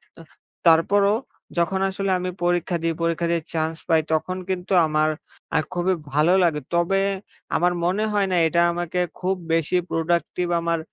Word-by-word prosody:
তা - - -13 0.5
তারপরও 200 +5 +4 0.4
যখন 170 +3 +1
আসলে 195 0 -2
আমি 180 0 -3
পরীক্ষা 175 0 +1
দিই, 165 0 +1
পরীক্ষা 170 0 0
দিয়ে 170 -1 +1
চান্স 160 0 -1
পাই, 160 -2 +4
তখন 185 +4 -1
কিন্তু 185 +1 -2
আমার 155 0 +2 0.5
আ - - +4
খুবই 180 +1 +1 0.2
ভালো 155 +5 +4
লাগে। 155 -4 +1
তবে 175 +3 +2 0.6
আমার 175 +2 +2
মনে 190 +4 +1
হয় 200 -1 +2
না - - +2
এটা 170 +1 +2
আমাকে 175 +1 -3 0.2
খুব 190 +1 0 0.2
বেশি 165 +2 +1
প্রোডাক্টিভ 170 +2 -1
আমার 170 -1 0
175 Hz, 160 wpm, -23 LUFS, 165-185 Hz, 0.6 s, তারপরও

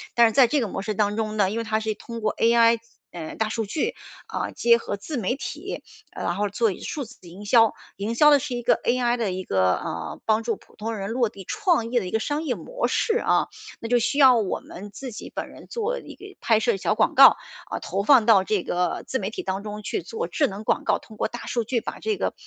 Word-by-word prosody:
但 235 - +7
是 - - 0
在 260 0 +6
这 290 +2 +1
个 230 - -1
模 195 - -4
式 215 +1 -2
当 205 0 +1
中 215 -1 -2
呢， 195 -3 +3
因 225 - -3
为 230 - -1
它 220 0 0
是 220 0 -1
通 230 -1 -8
过 215 -1 0
AI 230 0 +4 0.3
嗯， 165 -2 -7
大 220 -1 0
数 225 0 -2
据， 320 - -1 0.4
嗯， - - -2
结 235 0 +5
合 205 - -4
自 270 +8 -6
媒 230 +4 -1
体， - - -6 0.3
呃， - - -7
然 175 - -1
后 205 0 +1
做 215 +2 +1
一 - - -8
数 285 - -4
字 235 +1 -13
营 190 +5 -11
销。 225 0 +5 0.2
营 215 +4 -3
销 300 +5 +6
的 285 - +6
是 260 -2 -4
一 240 - -3
个 245 - +3
AI 245 0 +2
的 210 -5 -1
一 185 +1 -4
个， 95 - +2
呃， 85 -1 -5
帮 220 +1 +2
助 230 -1 -1
普 - - -22
通 225 +1 -3
人 195 0 -4
落 240 0 +1
地 200 -2 -10
创 340 - 0
业 245 - +3
的 205 - -5
一 - - -6
个 220 - 0
商 295 +5 -2
业 265 -6 -1
模 - - -3
式 450 0 +1
啊， - - +2 0.3
那 230 - -5
就 245 0 +4
需 280 +5 0
要 260 -4 +7
我 210 -4 -1
们 200 +2 -10
自 260 +4 -7
己 215 - -8
本 - - -4
人 - - -14
做 480 +2 -2
一 - - -11
个 400 -1 -13
拍 220 -2 +2
摄 225 -2 +1
小 - - 0
广 - - +2
告， - - +9 0.4
嗯， - - -3
投 200 - -2
放 250 -3 +6
到 200 -5 +5
这 205 -4 0
个 180 -1 -1
自 260 - -2
媒 195 +1 -3
体 - - -6
当 190 +1 -2
中 210 0 -7
去 - - -2
做 455 +1 -4
智 290 -3 +2
能 200 +1 -7
广 - - 0
告， - - +2
通 215 - -15
过 - - 0
大 240 - -8
数 235 -2 -1
据 235 0 0
把 - - -6
这 435 -1 -1
个， - - -2
225 Hz, 290 characters per minute, -24 LUFS, 205-250 Hz, 0.4 s, 告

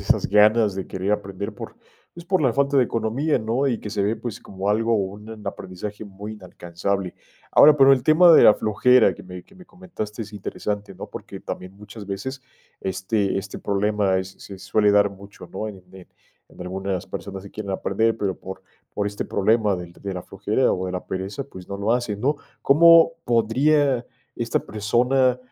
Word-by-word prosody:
esas - - +1
ganas 105 0 +4
de 95 - -5
querer 95 +2 -2
aprender 100 -1 -4
por, - - -9 0.4
pues, 170 0 -10
por 185 +1 +1
la 130 -5 +2
falta 140 0 +2
de 130 - +5
economía, 120 +8 0
¿no?, 120 +5 -1
y 120 -4 0
que 105 - -7
se 100 -1 -1
ve, 105 +3 0
pues, 115 -1 -6
como 95 +1 -4
algo 115 +2 +2
un 105 +2 -5
aprendizaje 100 +3 -6
muy 100 +2 -8
inalcanzable. 95 -1 -4 0.4
Ahora, 150 0 +7
pero 135 -1 +7
el 130 -2 +3
tema 165 +5 +6
de - - +8
la 105 - +8
flojera 125 +4 +4
que - - -12
me 90 -1 -9
que - - -23
me 185 -2 -16
comentaste 120 - -7
es 105 - -11
interesante, 105 0 -5
¿no?, - - -9
porque - - -9
también 90 +1 -7
muchas 105 0 -11
veces 130 +8 -5 0.4
este 95 +2 -1
este 95 0 -5
problema 100 -1 0
es 95 0 -4
se 95 -1 -10
suele 105 +2 +2
dar 100 0 +4
mucho, 100 -2 -13
¿no?, 110 +3 -4
en 95 -3 -11
en 95 -1 -13 0.4
en - - -16
algunas 95 0 -4
personas 95 -1 -7
que 100 - -11
quieren 105 -2 -6
aprender, 110 +4 0
pero 95 -3 -2
por 95 0 -9 0.3
por 105 - -2
este 100 0 -4
problema 105 0 +1
del 90 -1 -8
de 100 +2 -7
la 90 - -4
flojera 105 +6 0
o 95 0 -2
de - - -4
la 90 - -5
pereza, 95 +8 -4
pues 95 -9 -12
no 100 - -4
lo 100 +3 0
hacen, 120 -4 -2
¿no?, 140 +5 +2 0.3
¿cómo 165 +3 +6
podría 125 +3 +2 0.3
esta 115 0 -1
persona, 125 +4 +1
105 Hz, 195 wpm, -23 LUFS, 95-120 Hz, 0.4 s, de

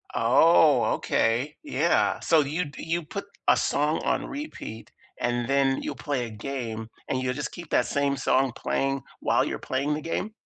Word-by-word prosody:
Oh, 140 +3 +5
okay. 120 +7 0
Yeah, 295 - +1
so 165 -2 +4
you'd 145 0 -3
you 170 0 -2
put 200 +6 -6 0.2
a - - +7
song 150 +2 +1
on - - 0
repeat, 280 - -7 0.3
and 120 -1 -1
then 135 -1 +2
you'll - - -3
play 135 -4 -2
a 115 - -7
game, 110 -2 -5 0.2
and 130 -1 -1
you'll 125 0 -1
just 145 - -4
keep 170 -3 -9
that 125 - +3
same 140 -1 0
song 130 -1 +2
playing 135 -1 -1 0.2
while - - +2
you're - - -3
playing 140 +3 -1
the 150 - -3
game? 190 +6 -3
140 Hz, 170 wpm, -26 LUFS, 125-155 Hz, 0.3 s, a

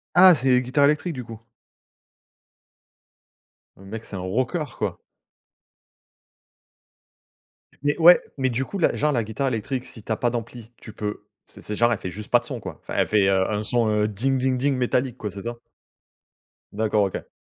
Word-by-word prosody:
Ah, 180 -1 +9
c'est 130 0 0
les 125 0 +5
guitares 130 +3 +1
électriques, 150 +4 +1
du 125 -3 -6
coup? 115 -1 -10 2.4
Le 95 - -16
mec, 110 +3 -7
c'est - - -7
un 95 - -4
rockeur, 125 - -2
quoi! 100 -5 -2 2.9
Mais 145 +2 +1
ouais. 175 +2 +8 0.2
Mais 130 -1 +1
du 125 +3 -1
coup, 200 - -6
la 170 - +2
genre, 150 +1 +1
la 120 -4 +1
guitare 110 +6 -2
électrique, 125 +2 -2
si 115 -5 -8
tu 110 - -6
as 110 - +1
pas 120 - +1
d'ampli, 115 0 -6
tu 110 - -12
peux 105 0 -5 0.2
c'est - - -14
c'est 105 - -4
genre, 120 +2 +3
elle - - -3
fait 90 - -5
juste 105 0 -9
pas - - +6
de - - -13
son, - - -5
quoi? - - -8
Enfin - - -7
elle - - +2
fait, 105 -2 +3
heu, 95 -1 +2
un 105 0 -1
son, 115 +1 +1
heu, 105 0 +2
ding 130 +6 0
ding 130 0 +1
ding 140 +2 +1
métallique, 125 0 0
quoi, 105 -5 -5
c'est 100 -1 -9
ça? 120 0 -5 1.1
D'accord, 105 -1 +1
OK. - - -7
120 Hz, 195 wpm, -24 LUFS, 105-130 Hz, 2.9 s, Ah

